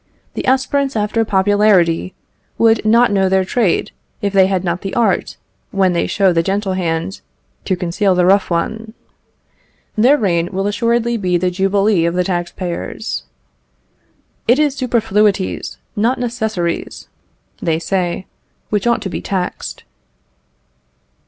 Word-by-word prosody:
The - - -4
aspirants 270 +1 +1
after 215 +1 +1
popularity 195 -4 +2 0.4
would 225 -1 +3
not 230 +2 +4
know 195 -2 +2
their 190 0 +2
trade, 205 -2 0 0.3
if 200 -1 -2
they 190 -1 +5
had 190 -2 -1
not 170 -1 -2
the 195 - -5
art, 235 - 0 0.3
when 190 -2 +2
they 170 - 0
show 195 -3 +2
the 165 - +3
gentle 195 +2 -1
hand, 175 +1 -2 0.4
to 190 - +1
conceal 180 +2 0
the 180 0 +3
rough 195 +2 +3
one. 220 +6 -3 1.0
Their 250 +7 +5
reign 175 -6 0
will 195 +1 -2
assuredly 235 +2 0
be 180 -4 +1
the 180 +1 0
jubilee 195 0 +2
of 170 - -2
the 180 - +2
tax 175 -2 -2
payers. 175 -2 -5 1.2
"It 240 +3 +5
is 295 -2 +2
superfluities, 210 -6 0 0.2
not 230 +5 +1
necessaries," 220 -8 -3 0.5
they 160 -1 +1
say 180 +1 -2 0.5
"which 210 +2 0
ought 235 - +1
to 195 - -3
be - - -4
taxed." 185 -2 -4
195 Hz, 140 wpm, -17 LUFS, 180-220 Hz, 1.2 s, they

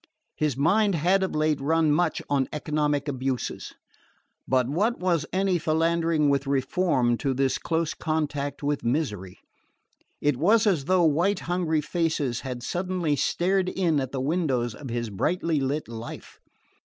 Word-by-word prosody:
His 150 -4 -1
mind 195 +7 +3
had 180 +5 +2
of 190 - -2
late 155 -2 +1
run 160 +2 +2
much 165 +2 +1
on 140 -2 +1
economic 150 -1 -1
abuses; 130 -2 -3 0.7
but 130 -2 +2
what 205 - 0
was 170 -4 0
any 190 -1 +1
philandering 165 -1 +1
with 140 0 +1
reform 135 -3 +1
to 135 -2 -1
this 135 0 +1
close 165 -1 -1
contact 145 -3 -2
with 145 0 -1
misery? 110 - -2 0.8
It 145 -3 +1
was 210 - +4
as 175 -10 +1
though 185 +1 +3
white 170 +7 +2
hungry 170 -3 0
faces 150 -6 -1
had 125 -2 -6
suddenly 175 0 -1
stared 185 +5 +1
in 170 -6 +1
at 130 -1 -3
the 135 - -3
windows 135 -6 0
of 135 +2 -9
his 120 -2 -3
brightly 160 - 0
lit 140 +3 -2
life. 115 0 -9
150 Hz, 150 wpm, -26 LUFS, 135-175 Hz, 0.8 s, was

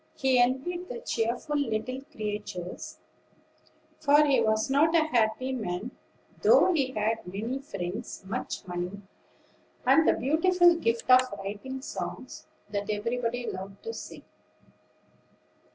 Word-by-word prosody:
He 260 -2 +3
envied 285 +9 0
the - - -5
cheerful 245 - -2
little 255 0 -2
creatures; 205 -4 -5 1.0
for 295 0 +5
he 270 -4 +3
wasn't 270 +9 +2
a 325 - +5
happy 245 -1 +1
man, 215 -2 -3 0.5
though 370 - +6
he 270 -5 0
had 215 -1 -1
many 220 +8 -3
friends, 200 -5 -6
much 190 - -4
money, 180 +2 -5 0.8
and 320 - +5
the - - +6
beautiful 345 +5 +4
gift 230 -8 -1
of 255 0 +9 0.2
writing 210 +7 -6
songs - - -6 0.2
that 205 0 -3
everybody 235 +3 -1
loved 195 +1 -7
to 455 - -4
sing. - - -9
245 Hz, 120 wpm, -28 LUFS, 210-280 Hz, 1.0 s, of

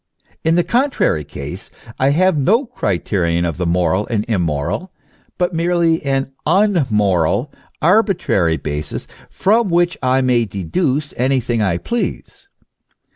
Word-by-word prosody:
In 160 +1 +2
the 175 - +3
contrary 245 - +1
case, 70 +6 -8 0.3
I 135 - +3
have 185 +5 +3
no 210 - +2
criterion 90 - -1
of 85 -1 -3
the 90 -1 -1
moral 90 +3 +1
and 110 -3 -1
immoral, 90 - -2 0.5
but 180 0 0
merely 170 -1 +1
an 135 -1 -1 0.2
immoral, 130 - +2 0.3
arbitrary 170 - +2
basis, 75 -1 -5 0.2
from 215 +1 +2
which 175 0 +1
I 130 +1 +2
may 125 -3 +2
deduce 130 - -2
anything 125 -2 0
I 95 -5 +1
please. 240 - -4
130 Hz, 125 wpm, -18 LUFS, -, 0.5 s, the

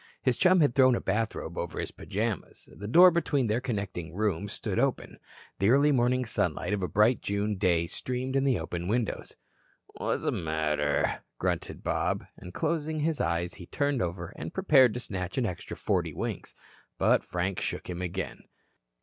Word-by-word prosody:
His 130 -2 +2
chum 185 +4 +5
had 145 -5 +3
thrown 130 -2 +5
a - - -1
bathrobe 110 +3 -2
over - - -4
his - - -3
pajamas. 105 -3 -4
The 105 - -7
door 180 +10 +8
between 150 -6 +1
their 110 +2 0
connecting 100 -9 -4
rooms 100 -1 -1
stood - - -2
open. - - -1 0.4
The 100 - +3
early 140 +4 +5
morning 125 -1 +2
sunlight 100 -4 0
of 100 - -1
a 90 - 0
bright 110 +6 +3
June 100 +1 -1
day 90 -3 +2
streamed 130 +8 -3
in 135 - +3
the 135 -3 +2
open 85 +1 -4
windows. 115 +2 -2 0.6
"Whazzamatter?" 75 -2 0 0.2
grunted - - -2
Bob, - - 0
and 90 - -10
closing 155 - -1
his 160 0 0
eyes 85 +1 0
he 90 -3 -10
turned 140 -3 0
over 85 0 -4
and - - -6
prepared 135 - +5
to - - -2
snatch 90 -5 -4
an 130 - +2
extra 90 -6 -5
forty - - 0
winks. - - -4 0.4
But - - +3
Frank 90 +2 -2
shook - - -3
him 90 0 -5
again. 90 +1 -4
105 Hz, 170 wpm, -28 LUFS, 90-130 Hz, 0.6 s, door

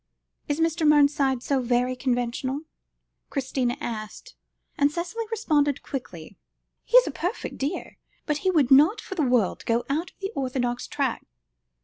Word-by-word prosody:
"Is 290 +1 -1
Mr. 330 0 +1
Mernside 285 -3 +3
so 275 -2 +1
very 250 +1 +1
conventional?" 255 +2 -1 0.7
Christina 260 -2 -1
asked, 230 - -6 0.4
and 285 0 +3
Cicely 355 +8 -4
responded 295 - +1
quickly 185 - -7 0.4
"He's - - +6
a - - -3
perfect 360 +7 -4
dear, 290 +7 -3 0.3
but 300 -1 -1
he 380 - +1
would 300 -8 +2
not 300 - +6
for - - -7
the 355 - -1
world 245 -8 +1
go 235 +1 +2
out 320 +5 -1
of - - -32
the 395 +1 -4
orthodox 250 -2 -2
track. 275 -5 -2
280 Hz, 145 wpm, -25 LUFS, 250-320 Hz, 0.7 s, He's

